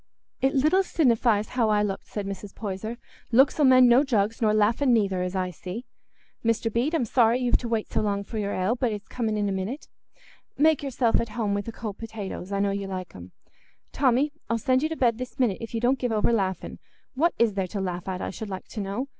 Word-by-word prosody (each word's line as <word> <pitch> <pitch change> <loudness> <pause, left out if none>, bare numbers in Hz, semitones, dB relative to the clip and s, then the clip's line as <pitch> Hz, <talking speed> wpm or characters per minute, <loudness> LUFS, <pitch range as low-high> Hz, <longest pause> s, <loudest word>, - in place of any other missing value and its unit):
"It 270 +1 +2
little 305 +8 +4
sinnifies 235 - +2
how 235 -3 +1
I 210 -1 +3
looked," 195 -2 -3
said 205 -2 -5
Mrs. 195 0 -7
Poyser; 215 +2 -5 0.3
"looks 265 +6 +4
'ull 290 - +6
mend 255 -1 +7
no 245 +3 +6
jugs, 225 -5 0
nor 215 -2 +3
laughing 225 +6 +3
neither, 200 -5 +2
as 180 +1 -3
I 185 -1 -1
see. 185 +8 -7 0.6
Mr. 230 -1 0
Bede, 265 +8 +1
I'm 260 - +1
sorry 230 +1 +3
you've 245 -1 +2
to 240 - -5
wait 225 -2 -2
so - - +1
long 200 -1 -1
for 220 +2 -5
your 200 -1 -2
ale, 190 +6 0
but 245 -2 0
it's 205 -1 -6
coming 220 -3 -2
in 205 -1 0
a - - -1
minute. 195 +9 -4 0.7
Make 310 0 +4
yourself 255 -4 +1
at 230 - -4
home 210 -4 0
wi' 200 - 0
th' 230 +2 -8
cold 210 -4 -6
potatoes: 210 -4 -6
I 200 - -1
know 200 0 +1
you 200 0 -3
like 185 -2 -6
'em. 90 0 -11 0.6
Tommy, 265 +2 +2 0.2
I'll 230 - +1
send 255 +3 +2
you 310 - 0
to 320 - -3
bed 235 -2 +2
this 255 +1 -7
minute, 230 -7 +1
if 230 0 -6
you - - 0
don't 250 +3 +2
give 245 -2 -1
over 220 +2 +2
laughing. 190 -4 -2 0.3
What 325 +6 +1
is 230 -3 +3
there 195 -2 -1
to 200 - -5
laugh 180 -1 -4
at, 185 -1 -3
I - - -3
should 215 +2 -7
like 190 -1 -6
to 215 - -5
know? 200 +7 -3
225 Hz, 240 wpm, -26 LUFS, 200-250 Hz, 0.7 s, mend